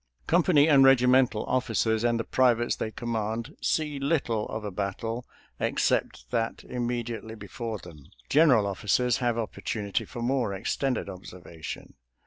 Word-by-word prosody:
Company 165 -3 +4
and 140 -4 +6
regimental 125 -3 +4
officers 115 -3 0
and 120 -1 +2
the - - -1
privates 120 -2 +2
they 110 - -3
command 115 0 -3
see 150 -3 0
little 135 -7 0
of 110 -1 -5
a 105 - -4
battle 110 +5 -4 0.3
except - - 0
that 115 0 -1
immediately 120 -2 -4
before 110 +2 -6
them. 80 -7 -13 0.2
General 140 -8 +5
officers 105 +5 +1
have 120 -2 0
opportunity 105 -2 -3
for 120 -2 -7
more 120 -5 0
ex 95 - -2
tended 135 -7 -1
observation. 90 -3 -9
115 Hz, 135 wpm, -27 LUFS, 105-130 Hz, 0.3 s, and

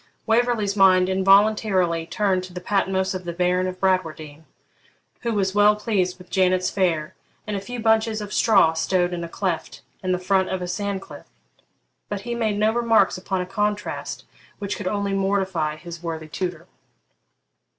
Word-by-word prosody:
Waverley's 225 -3 +1
mind 185 -2 +5
involuntarily 190 -3 +3
turned 185 +1 0
to 185 - -13
the 180 - -5
Patmos 190 0 0
of 185 -1 -5
the 175 - -4
Baron 180 +1 +1
of 185 0 -6
Bradwardine, 160 -5 -1 0.7
who 235 - -2
was 195 -3 0
well 205 +1 +5
pleased 200 -4 -1
with 180 -1 -16
Janet's 185 -1 +2
fare 165 -6 0 0.3
and 210 - -3
a 195 - -3
few 245 +4 -6
bunches 220 0 +2
of 210 -1 -6
straw 195 -8 +4
stowed 175 +2 0
in 170 -1 -4
a 170 - -6
cleft 175 -3 -3 0.2
in 185 - -1
the 180 - +2
front 190 +1 +1
of 190 - -2
a 180 - -4
sand 195 +1 -3
cliff; - - -12 0.8
but 205 -2 -3
he 240 +3 -4
made 220 -3 -1
no 215 +1 +2
remarks 230 -4 +3
upon 190 0 -3
a - - -3
contrast 205 +2 -3 0.3
which 200 0 -4
could 195 - -5
only 200 0 -1
mortify 190 -5 0
his 170 +1 -10
worthy 160 -2 -5
tutor. 175 +1 -4
190 Hz, 170 wpm, -23 LUFS, 180-205 Hz, 0.8 s, mind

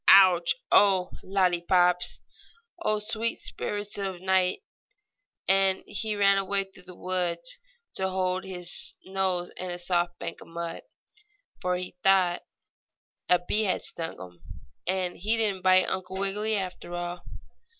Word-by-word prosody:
Ouch! 185 -3 +7 0.2
Oh, 190 -3 +5
lollypops! 180 -1 +2 0.6
Oh, 215 -10 +1
sweet 225 +2 0
spirits 205 0 -4
of 190 -2 -3
nitre!" 185 - +1 0.8
And 195 0 +3
away - - -23
he 215 +1 -2
ran 200 -1 +4
through 195 -1 -2
the 180 -1 -11
woods 175 -2 -2 0.4
to 190 0 +1
hold 185 0 -1
his 180 -2 +1
nose 190 -2 -1
in 185 - -5
a 175 - -3
soft 175 -1 0
bank - - -6
of - - -12
mud, 170 0 -5 0.8
for 180 -1 0
he 180 0 -6
thought 185 -2 +3 0.9
a 180 - +6
bee 215 +1 +1
had 190 - 0
stung 165 -1 -5
him. 90 -2 -11 0.5
And 185 -1 0
so - - -18
he 215 +5 +1
didn't 205 -4 +1
bite 185 0 +5
Uncle 190 0 -3
Wiggily 210 +3 0
after 185 -2 -5
all. 175 0 -4
185 Hz, 140 wpm, -27 LUFS, 175-195 Hz, 0.9 s, Ouch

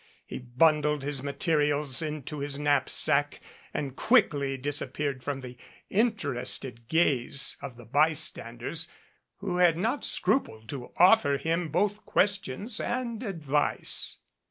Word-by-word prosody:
He - - -7
bundled 150 +3 +1
his 140 -2 -2
materials 145 -1 0
into 150 -1 -5
his 140 0 -2
knapsack 145 -2 +3 0.3
and 135 -3 -4
quickly 140 - +2
disappeared 140 0 -2
from 140 0 -4
the 125 -1 -10 0.3
in 225 +3 +2
terested 120 - -2
gaze 140 -4 +2
of 130 -4 -8
the 120 - -13
bystanders, 145 +1 0 0.5
who 185 -3 -2
had 175 -3 +4
not 230 +10 -1
scrupled 110 - -1
eo 125 -3 -8
offer 180 -5 +5
him 165 +2 -2
both 205 +6 -1
questions 200 - -1
and 240 -2 -3
advice. 155 - 0
150 Hz, 120 wpm, -27 LUFS, 135-175 Hz, 0.5 s, offer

